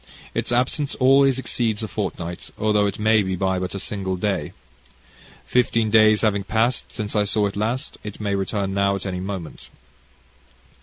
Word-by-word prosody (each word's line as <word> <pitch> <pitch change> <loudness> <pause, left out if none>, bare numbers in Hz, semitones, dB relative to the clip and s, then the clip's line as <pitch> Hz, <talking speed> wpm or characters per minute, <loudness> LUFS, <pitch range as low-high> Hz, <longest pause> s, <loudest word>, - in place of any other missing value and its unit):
Its - - -1
absence 130 +4 0
always 135 0 +4
exceeds 115 -4 -1
a - - -2
fortnight, 90 -4 -5
although 105 -1 +2
it 100 - -3
may 110 0 +4
be 95 -1 -2
but 95 0 0
by 90 - -2
a - - -4
single 95 -2 -3
day. 95 -5 -2 0.9
Fifteen 115 - +1
days 110 -1 +5
having 100 -3 +1
past 110 +5 +1
since 105 -2 -5
I 105 - +3
saw 105 +1 +1
it 100 - -3
last, 115 +5 -2
it 105 -1 -7
may 100 -2 -1
return 100 0 -1
now 100 0 +2
at 100 - -6
any 90 -2 -3
moment." 95 -4 -6
105 Hz, 170 wpm, -22 LUFS, 95-110 Hz, 0.9 s, days